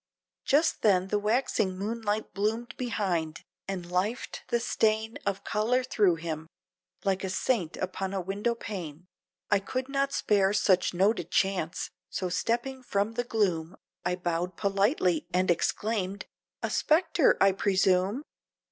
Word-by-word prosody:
Just 310 +4 +3
then 190 -3 +3
the 210 - +1
waxing 210 -3 +1
moonlight 215 +1 -2
bloomed 220 +4 -1
behind, 180 -10 -2 0.2
and 190 -3 -4
lifed 185 +8 -2
the 235 - +1
stain 220 -1 0
Of 195 -1 -1
color 235 +5 +1
thro' 205 -8 +3
him, 160 -1 -5 0.6
like 190 -1 +1
a 190 - -2
Saint 190 -3 0
upon 185 +1 -3
a 195 - -1
window 200 +6 -1
pane, 175 -8 -7 0.5
I 205 - +5
could 255 +6 -3
not 275 0 0
spare 200 -6 +2
such 185 -3 +3
noted 200 +5 +2
chance; 190 -4 0 0.2
so 185 - -2
stepping 240 +8 -1
from 205 -3 0
the 245 +1 -1
gloom, 190 -8 0 0.3
I 180 - 0
bowed 175 0 -2
politely 195 - +1
and 185 0 +3
exclaimed 200 +2 -1 0.4
"A - - -1
Spectre 325 -1 +3
I 195 - +6
presume?" 195 +4 +2
200 Hz, 140 wpm, -28 LUFS, 185-230 Hz, 0.6 s, I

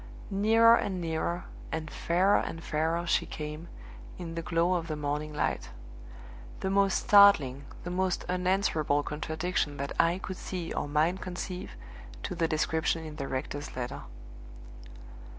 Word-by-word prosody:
Nearer 225 +4 +6
and 190 -2 -2
nearer, 170 +1 -2 0.3
and 160 -1 -4
fairer 185 +4 +3
and 165 0 -5
fairer 165 +2 0
she - - +1
came, 150 +2 -6 0.5
in 170 -2 -6
the 165 - -3
glow 170 +2 +1
of 170 -2 -1
the 155 - -2
morning 150 +1 -2
light 150 - -2 0.9
the 190 - -1
most 195 0 +3
startling, 150 -10 +6 0.2
the 175 - -4
most 185 0 0
unanswerable 180 -5 +1
contradiction 160 0 -2
that 140 0 -3
eye 170 +2 +2
could 190 -1 -6
see 180 -3 -5
or - - -2
mind 155 +5 +1
conceive 180 0 -5 0.5
to - - -3
the 165 -1 +1
description 160 0 0
in 155 -1 -8
the 140 -2 -3
rector's 140 +2 -4
letter. 125 -1 -4
165 Hz, 145 wpm, -29 LUFS, 150-185 Hz, 0.9 s, Nearer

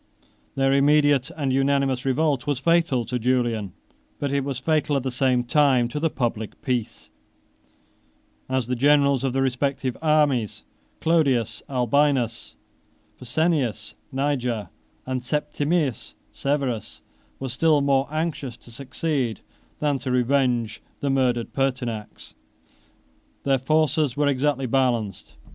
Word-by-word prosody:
Their 135 0 +2
immediate 145 0 +3
and 145 -5 -2
unanimous 135 -1 +1
revolt 140 -1 +1
was 145 -2 +1
fatal 165 -4 +2
to 125 +2 -2
Julian, 115 -5 0 0.4
but 140 -1 -2
it 140 -1 +1
was 135 -2 -3
fatal 150 +2 0
at 135 - 0
the 130 - -2
same 125 -1 +1
time 130 -2 +3
to 150 - -4
the 165 +1 +1
public 115 -6 -3
peace, 125 -5 -3 1.4
as 130 -2 0
the 125 +2 -2
generals 140 0 +3
of 135 - 0
the 135 0 +1
respective 130 0 -1
armies, 150 -8 +1 0.4
Clodius 140 -9 +1
Albinus, 130 -2 +1 0.6
Pescennius 125 -5 -1 0.2
Niger, 130 -5 -1 0.4
and 130 -1 -2
Septimius 145 - -1 0.2
Severus, 135 -6 -2 0.4
were 135 - -4
still 150 +4 +3
more 140 -1 +2
anxious 155 -5 -3
to 120 - -17
succeed 135 -1 -3 0.4
than 145 -2 0
to 130 - -5
revenge 125 -3 +1 0.2
the 140 - 0
murdered 125 -3 0
Pertinax. 125 -5 -3 1.1
Their 135 -1 +2
forces 150 0 +1
were 145 0 +2
exactly 140 0 +1
balanced. 120 -5 -1
135 Hz, 120 wpm, -24 LUFS, 125-145 Hz, 1.4 s, immediate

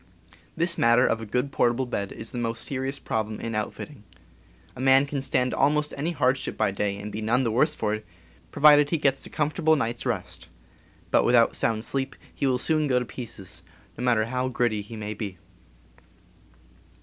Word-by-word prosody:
This 170 +1 +1
matter 115 +2 +5
of 115 - 0
a 110 - -7
good 125 +6 -1
portable 120 +1 +1
bed 100 -5 -4
is 110 - -7
the 120 - -4
most 115 -1 -3
seri 135 -1 -3
ous 140 - -4
problem 110 -4 -3
in 115 - -4
outfitting. 110 +4 -5 0.7
A - - -12
man 135 +1 +5
can 140 -1 -3
stand 130 -2 0
almost 150 +1 +1
any 145 +4 -2
hardship 130 -5 0
by 110 -3 +1
day, 100 0 -2
and 105 +1 -7
be 105 +2 -5
none 120 +4 +1
the 115 - 0
worse 150 +7 +2
for 105 -5 -1
it, 110 0 -4 0.5
pro - - -8
vided 145 -1 +7
he 165 - +1
gets 135 -3 +1
a - - -12
comfortable 155 +1 +1
night's 120 -5 -2
rest; - - -4 0.6
but - - +4
without 120 -1 +4
sound 110 0 0
sleep 135 -1 -2 0.2
he 140 - -1
will 130 -1 +2
soon 155 +3 +2
go 130 -2 +2
to 125 - 0
pieces, 100 -10 -9 0.3
no 125 - -6
matter 115 -3 +2
how 125 +2 -2
gritty 120 -4 0
he 105 +3 -10
may 105 -1 -5
be. 100 -3 -6
125 Hz, 195 wpm, -26 LUFS, 110-140 Hz, 0.7 s, vided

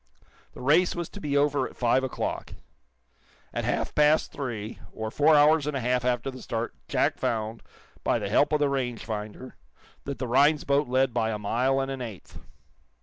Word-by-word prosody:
The - - -10
race 155 +8 +3
was 175 -2 -4
to 205 - -10
be 145 -4 0
over 145 0 +2
at - - -18
five 125 +2 +2
o'clock. 130 - -4 1.0
At - - -2
half - - -1
past 150 +1 +3
three, 115 -6 -5
or 110 0 -5
four 150 +5 +4
hours 150 0 +5
and 150 -2 -1
a - - -1
half 125 0 0
after 125 +1 0
the 130 -1 -10
start, 115 0 -3
Jack - - +1
found, 110 0 -2 0.4
by - - +2
the - - -3
help 145 - +3
of 150 - +2
the 145 - +3
rangefinder, 120 -3 -4 0.5
that 140 -1 -4
the 130 - -3
Rhinds 145 +5 +4
boat 140 0 +1
led 130 0 +2
by 110 - +1
a 110 - -2
mile 125 +6 +1
and 135 0 -2
an 135 -1 -5
eighth. 110 -7 -8
130 Hz, 190 wpm, -27 LUFS, 120-145 Hz, 1.0 s, hours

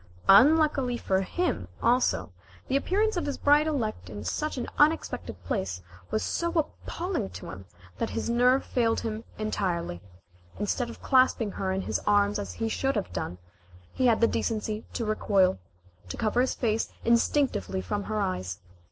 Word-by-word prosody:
Unluckily 270 +2 +5
for 190 -4 0
him, 350 - -1
also, 240 - +1 0.3
the 265 - 0
appearance 405 +8 +1
of 345 - -1
his 285 - -2
bride 295 +2 +4
elect 245 -9 -2
in 105 -1 -7
such 305 - -2
an 245 - -2
unexpected 295 - +1
place 90 +1 -3 0.3
was 215 - -1
so 340 - -1
appalling 340 +3 -2
to - - -8
him - - -10 0.3
that - - -1
his - - -3
nerve 250 +3 +3
failed 230 -2 +1
him 220 0 -4
entirely. 180 - -2 0.6
Instead 235 +4 -1
of - - -11
clasping 255 -5 +3
her 190 -1 -2
in 190 +1 -1
his - - -1
arms 205 0 +3
as 205 - -5
he 225 - -2
should 270 +4 0
have 205 - -3
done, 90 - -4 0.6
he 255 - +2
had 230 -2 +3
the 230 - +6
decency 215 -2 -2
to 230 - -3
recoil, 195 - +2 0.5
and - - -5
cover 225 +3 +1
his 260 - 0
face 225 -2 0
instinctively 235 -3 +2
from 205 +1 -3
her 215 0 -2
eyes. 95 - -2
225 Hz, 165 wpm, -27 LUFS, 200-270 Hz, 0.6 s, the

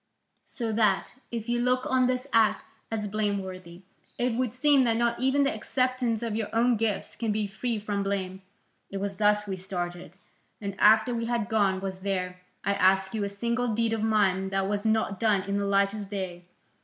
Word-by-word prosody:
So 230 -3 -4
that, 210 -3 +1 0.2
if 230 -1 -5
you 240 0 0
look 250 +1 +1
on 255 -1 +3
this 255 0 -1
act 225 -2 +3 0.2
as 215 -2 -2
blameworthy, 190 -4 -3 0.3
it 245 0 0
would 250 0 0
seem 275 +2 +4
that 225 -1 +2
not 235 0 +1
even 265 +2 +3
the 275 +3 +1
acceptance 255 -5 -1
of 225 -2 -2
your 220 -2 -1
own 235 +2 +3
gifts 215 -2 -2
can 225 -2 -1
be 210 0 0
free 225 +3 -3
from 205 -1 -2
blame. 190 -1 -3 0.5
It 195 - -5
was 195 0 -3
thus 210 0 +3
we 195 -2 -4
started, 180 -1 -5 0.4
and 200 -2 -4
after 220 +3 +5
we 230 -1 -2
had 235 -3 -1
gone, 200 -4 +2
was 190 -1 -4
there, 180 -2 -3 0.2
I 200 - +1
ask 190 0 +3
you, 215 -2 -1
a 200 - -1
single 235 +3 -1
deed 230 0 +1
of 225 - -1
mine 200 -3 +2
that 195 0 0
was 205 +1 -2
not 220 -3 +1
done 210 -4 +2
in 200 +1 -1
the 200 - -1
light 200 0 +2
of 205 -2 -6
day? 185 -3 -5
210 Hz, 200 wpm, -27 LUFS, 195-230 Hz, 0.5 s, after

